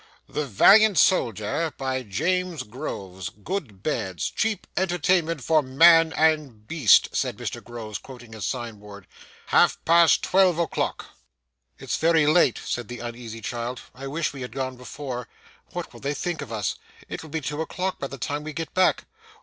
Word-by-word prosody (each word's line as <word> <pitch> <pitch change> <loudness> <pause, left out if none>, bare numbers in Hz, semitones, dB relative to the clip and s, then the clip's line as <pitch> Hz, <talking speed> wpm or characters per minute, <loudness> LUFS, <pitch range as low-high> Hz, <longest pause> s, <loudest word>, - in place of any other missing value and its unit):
'The 150 -1 -3
Valiant 205 - +6
Soldier, 120 - +2
by 130 -1 -2
James 170 - -1
Groves. 95 -6 -6
Good 105 - -6
beds. 95 - -2
Cheap 220 -1 -1
entertainment 175 -4 +1
for 155 +5 +3
man 165 +4 +6
and 150 -9 +1
beast,' 155 -10 +5
said - - -1
Mr - - -5
Groves, 110 -3 -7
quoting 120 -4 -12
his 110 -3 -7
sign 115 0 -4
board. 100 -1 -12 0.4
'Half - - +4
past 170 0 +5
twelve 185 -3 +3
o'clock.' 170 -1 -2 0.7
'It's - - -3
very 160 -2 +3
late,' 155 -4 +3
said 120 -3 -3
the 120 - -7
uneasy 120 -1 -7
child. 120 +3 -4
'I 135 +2 -8
wish 155 +3 -2
we 135 - -8
had 125 - -6
gone 130 -1 -3
before. 125 -1 -6 0.4
What - - -7
will - - -12
they 140 +1 -2
think 175 +1 -3
of - - -8
us! 105 -3 -1 0.3
It - - -6
will 160 - -11
be 160 +2 -2
two 150 +2 -3
o'clock 185 +3 -3
by 140 - -3
the 135 - -8
time 145 +4 -3
we 155 0 -6
get 165 +2 -5
back. 185 0 +2
140 Hz, 170 wpm, -25 LUFS, 115-165 Hz, 0.7 s, Valiant